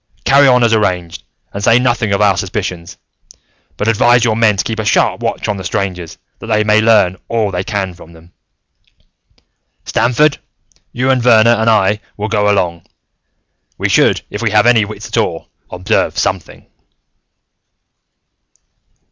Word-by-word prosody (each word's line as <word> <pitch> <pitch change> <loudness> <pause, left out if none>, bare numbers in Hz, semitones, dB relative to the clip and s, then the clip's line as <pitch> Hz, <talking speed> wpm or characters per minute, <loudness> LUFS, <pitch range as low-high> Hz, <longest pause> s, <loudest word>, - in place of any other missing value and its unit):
Carry 140 +1 +4
on 125 -2 +3
as 115 -1 +2
arranged, 90 -6 -1 0.3
and 100 - -6
say 115 - +4
nothing 120 -4 0
of 100 +1 0
our 100 -2 +3
suspicions, 90 -3 -5 0.8
but 105 - -3
advise 120 +2 +3
your 110 -2 +1
men 110 -3 +2
to - - 0
keep 110 -1 -5
a - - -2
sharp 105 - +1
watch - - -3
on 105 - -2
the 95 - -7
strangers, 90 -2 -4 0.2
that - - -10
they 110 -1 +1
may 105 0 +2
learn 105 -5 +2
all 110 -3 -1
they 90 0 -3
can 95 -2 -4
from 85 -1 -16
them. 85 +1 -18 1.5
"Stamford, 140 +5 +1 0.5
you 130 +2 0
and 130 -2 +1
Verner 115 -1 +4
and 115 -1 +1
I 105 -1 +2 0.2
will 105 +1 -4
go 105 -2 +1
along. 90 -5 -1 0.9
We - - -2
should, - - +2
if - - -6
we 115 - 0
have 105 +1 +2
any 115 -3 +3
wits 110 +1 -9
at - - -5
all, - - -2 0.2
observe 90 +4 -2
something." - - -3
105 Hz, 160 wpm, -14 LUFS, 95-115 Hz, 1.5 s, Carry